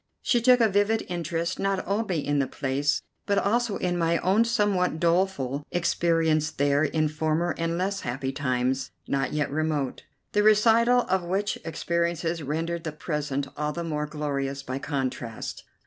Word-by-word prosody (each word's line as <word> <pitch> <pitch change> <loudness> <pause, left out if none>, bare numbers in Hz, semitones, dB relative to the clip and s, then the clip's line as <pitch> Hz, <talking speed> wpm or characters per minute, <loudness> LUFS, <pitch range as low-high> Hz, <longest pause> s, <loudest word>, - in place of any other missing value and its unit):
She 240 - +2
took 250 +1 +6
a 225 - +6
vivid 205 +2 +1
interest, 170 0 -2
not 195 -1 0
only 200 -6 -1
in 145 0 +1
the 135 - +1
place, 145 +1 -1 0.2
but 200 -1 +2
also 230 +1 +1
in 180 -1 -1
my 170 0 +2
own 200 +7 +3
somewhat 205 -8 +1
doleful 165 -6 +1
experience 165 -3 +2
there 145 +1 +1
in 155 +1 +1
former 155 +3 0
and 165 0 -1
less 195 +2 -1
happy 130 +2 -3
times, 130 -1 -1 0.2
not 135 -2 0
yet 150 -2 -1
remote, 150 -3 -1 0.3
the 210 - +3
recital 225 +3 +5
of 190 -4 0
which 195 +4 -1
experiences 170 0 -1
rendered 165 +4 -2
the 160 - -3
present 150 -3 -3
all 150 0 -2
the 170 - -4
more 150 -2 -2
glorious 140 -2 -3
by 130 0 -4
contrast. 130 -5 -4
165 Hz, 160 wpm, -26 LUFS, 145-190 Hz, 0.3 s, took